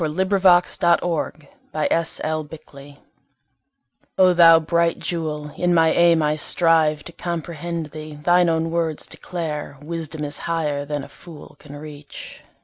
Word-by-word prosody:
Poem 155 +2 -2
On 190 - +2
Virtue 175 -5 +2 0.2
By 155 - -1
Phillis 165 -1 0 0.3
Wheatley 140 -2 -13 1.2
O 185 -1 +5
Thou 165 -1 +7
bright 170 +1 0
jewel 150 -3 -4
in 175 +1 +1
my 160 -1 +4
aim 170 -2 +4
I 150 0 0
strive 155 -2 +2
To - - -10
comprehend 170 -2 -5
thee. 155 -1 -9
Thine 175 +4 +3
own 165 0 0
words 165 -2 -2
declare 155 -5 -6
Wisdom 160 0 -6
is 145 0 -2
higher 150 -4 -1
than 145 -1 -4
a - - -9
fool 165 -4 -14
can 145 -1 -12
reach. 145 -1 -11
160 Hz, 140 wpm, -21 LUFS, 150-170 Hz, 1.2 s, Thou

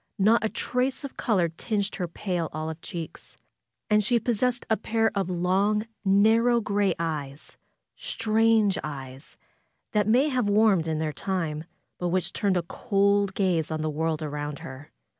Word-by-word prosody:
Not 220 +4 +4
a 220 - +1
trace 255 +5 -1
of 280 - -7
color 195 -8 +1
tinged 200 +5 -3
her 180 -3 -2
pale 175 -1 -3
olive 155 +1 -5
cheeks. 170 -3 -8 0.5
And 210 -1 +3
she 235 +3 +3
pos 230 -2 -1
sessed 250 -1 +1
a 220 - +3
pair 225 +1 0
of 195 -3 -1
long, 190 +4 +1 0.2
narrow 220 +5 +4
gray 200 -4 +1
eyes; 150 -4 -5 0.4
strange 220 -2 +2
eyes, 135 -2 -8 0.5
that 210 -1 +1
may 255 +7 +4
have 250 -6 0
warmed 205 -5 +4
in 160 -1 -1
their 155 -1 -2
time; 165 -3 -3 0.3
but 180 - -1
which 180 +1 0
turned 195 -3 +1
a 175 - 0
cold 200 0 +1
gaze 175 -5 +1
on 155 -1 -2
the 155 0 -1
world 160 +1 -1
around 145 -1 -4
her. 135 +2 -10
195 Hz, 160 wpm, -26 LUFS, 160-220 Hz, 0.5 s, Not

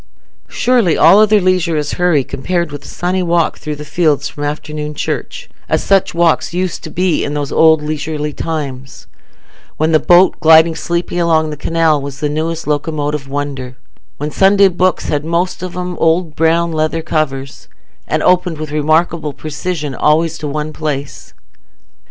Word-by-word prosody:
Surely 240 -9 +2
all 170 +6 +6
other 215 0 +5
leisure 180 -3 +1
is 150 -1 -2
hurry 175 -6 +2
compared 170 +5 -3
with 145 - -8
a - - -12
sunny 180 +1 -2
walk 170 -2 0
through 150 -1 -5
the 150 +1 -9
fields 150 -3 +1
from 145 - -7
"afternoon 150 0 -4
church"—as - - -4
such 195 -3 +2
walks 170 0 +1
used 185 -1 -2
to - - -7
be 180 -1 0
in 145 - -3
those 145 -2 -3
old 160 -1 +4
leisurely 150 0 -3
times, 140 -5 -5 0.7
when 155 +1 +1
the 155 - +4
boat, 175 +3 +4
gliding 160 +1 +6
sleepily 170 +2 -3
along 160 -2 +2
the - - -5
canal, 160 -1 +1
was 140 0 -7
the 150 - -1
newest 160 +2 -3
locomotive 150 -1 -2
wonder; 135 -3 -5 0.4
when 150 +1 -4
Sunday 195 +2 +4
books 185 +1 0
had 145 -1 -1
most 170 +3 -1
of 185 -1 -5
them 180 0 -4
old 165 -1 +1
brown 165 +1 +2
leather 160 +1 -1
covers, 135 -4 -3 0.4
and - - -1
opened 180 -2 +2
with 155 -1 -6
remarkable 155 0 0
precision 155 0 -4
always 160 +4 +1
in 150 -2 -3
one 150 +1 -4
place. 145 - -5
160 Hz, 165 wpm, -15 LUFS, 150-170 Hz, 0.7 s, all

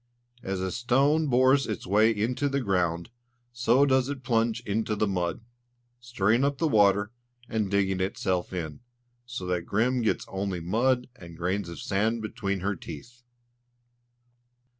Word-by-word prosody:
As 95 -3 -3
a 95 0 -2
stone 140 - +2
bores 130 +1 +4
its 110 -5 -4
way 105 +4 +4
into 115 +6 0
the 140 0 0
ground, 90 -4 -1 0.4
so 120 +3 +3
does 130 -1 +2
it 140 -2 -5
plunge 115 -1 +1
into 110 0 -1
the 105 - +1
mud, 90 -3 -2 0.6
stirring 120 0 +1
up 140 0 +1
the 165 - +1
water, 100 -4 +3 0.4
and 110 -3 -1
digging 95 -1 +1
itself 95 -1 -1
in, 80 -5 -5 0.5
so 120 -7 -5
that 90 -1 -2
Grim 120 +5 +1
gets 110 - 0
only 95 -1 -3
mud 120 +9 +1
and 85 -8 -12
grains 90 +2 -2
of 85 - -8
sand 110 +3 0
between 100 -3 -3
her 100 +2 -1
teeth. 120 +10 -10
110 Hz, 150 wpm, -27 LUFS, 95-125 Hz, 0.6 s, bores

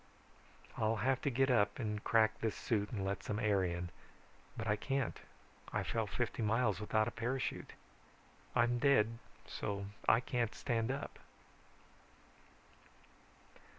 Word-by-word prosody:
"I'll 110 +1 +2
have 130 +4 +1
to - - +1
get 135 +1 +2
up 105 -4 +3
and 105 -3 -3
crack 110 -1 +3
this 110 -2 -1
suit 105 -3 0
and 100 -4 -3
let 100 +1 -2
some 105 - -3
air 105 -4 +2
in. 85 0 -2 0.7
But 115 - -3
I 105 -1 +2
can't. 135 +3 -1 0.5
I - - 0
fell - - -1
fifty - - -2
miles 110 -2 +2
without 110 +1 +2
a - - -2
parachute. 125 +3 -2 0.8
I'm 120 +1 +3
dead 115 -4 +3 0.3
so 100 -2 -3 0.2
I 115 - +6
can't 120 -2 -1
stand 115 -3 0
up." 135 +2 -4
110 Hz, 135 wpm, -36 LUFS, 105-120 Hz, 0.8 s, I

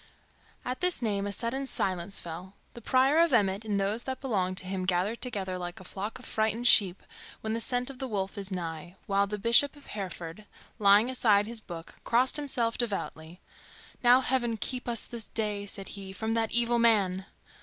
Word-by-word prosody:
At 255 +5 -4
this 360 -7 +3
name 200 -2 -1
a - - -3
sudden 245 +7 -2
silence 190 -4 -2
fell. 175 +4 -8 0.2
The 235 - -10
Prior 265 +6 +3
of 335 0 +4
Emmet 200 -2 +2
and 210 -2 -1
those 200 +4 0
that 260 -1 -4
belonged 190 -8 -1
to 190 - +1
him 185 0 -3
gathered 190 +5 0
together 190 -7 -2
like 175 0 -6
a - - -11
flock 200 +6 -5
of 255 - -10
frightened 220 +2 0
sheep 195 -5 +5 0.4
when 220 0 -2
the 230 - -1
scent 245 +3 +1
of 260 - -14
the 265 - -3
wolf 195 -4 -3
is 200 -2 -4
nigh, 175 -2 -6
while 200 0 +1
the 210 +1 -4
Bishop 235 +8 +4
of 290 - -17
Hereford, 185 -1 -6 0.3
laying 210 +4 +5
aside 210 -5 +3
his 230 0 -5
book, 170 -4 -10
crossed 250 +5 +3
himself 245 -6 0
devoutly. 180 -7 -4 0.6
"Now 245 +2 +6
Heaven 240 -3 0
keep 250 +4 -3
us 235 -2 0
this 235 -3 -6
day," 210 -2 -2
said 195 -1 -3
he, 195 -1 -7
"from 220 +3 -2
that 225 -1 0
evil 235 0 +3
man!" 200 -5 +2
210 Hz, 195 wpm, -29 LUFS, 190-240 Hz, 0.6 s, Now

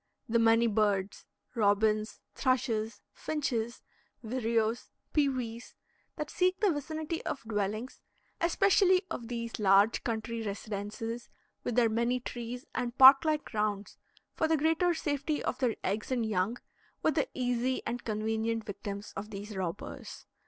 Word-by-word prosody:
The 230 +1 +2
many 230 +1 +5
birds 205 -3 0 0.3
robins, 215 0 +2
thrushes, 230 -5 0
finches, 240 -6 -2 0.4
vireos, 230 -1 0 0.2
pewees 255 -6 -1 0.4
that 300 0 -5
seek 370 +1 +1
the 415 -3 +4
vicinity 315 +2 -3
of 275 - -4
dwellings 215 +2 -3 0.4
(especially 375 +2 +4
of 235 - -4
these 230 -1 -4
large 200 +2 +4
country 230 0 -2
residences 215 +3 -5 0.3
with 245 - -2
their 240 -2 +5
many 235 +3 +1
trees 245 +1 -6
and 245 0 -3
park 270 +3 +9
like 305 -1 +1
grounds), 210 -2 -2 0.3
for 320 - +1
the 320 0 +3
greater 325 +3 +2
safety 290 0 -1
of - - -2
their 250 -4 +1
eggs 210 +6 -2
and 240 -3 +1
young, 210 +2 0 0.5
were - - +4
the 295 -1 0
easy 250 0 0
and 240 +1 -3
convenient 220 +1 -1
victims 200 0 -6
of 205 +2 -5
these 205 0 -7
robbers. 190 +1 -5
230 Hz, 135 wpm, -31 LUFS, 215-265 Hz, 0.5 s, park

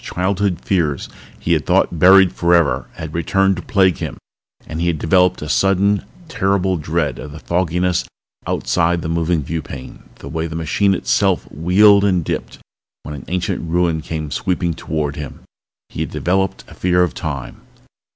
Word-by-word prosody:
Childhood 95 -1 -1
fears 80 -7 0 0.3
he - - 0
had - - 0
thought 85 - +2
buried 95 +1 +7
forever 85 -6 +2
had 80 -1 -7
returned 95 +3 +1
to - - -4
plague 95 -3 +2
him - - -5 0.5
and 80 +1 -5
he 85 - +1
had 85 -2 0
developed 90 +2 +2
a - - -5
sudden, 100 +4 +2 0.2
terrible 95 - 0
dread 80 0 -2
of 75 - -8
the 75 - -9
fogginess 90 +1 0 0.4
outside 85 -1 0
the - - -3
moving 85 -1 0
viewpane, 70 -4 -6
the - - -11
way 80 +3 -3
the 80 - -7
machine 90 +5 +1
itself - - +1
wheeled 100 +6 +5
and 90 -5 +1
dipped - - -4 0.5
when 75 - -7
an 70 -3 -8
ancient 90 0 -2
ruin 85 -2 +1
came 80 -1 -5
sweeping 90 -1 -1
toward 75 -2 -3
him. 70 -3 -7 0.5
He - - -9
had - - -2
developed 95 +1 -1
a - - -13
fear 90 0 +2
of 90 - -1
Time. 70 -6 -6
85 Hz, 165 wpm, -19 LUFS, 80-95 Hz, 0.5 s, buried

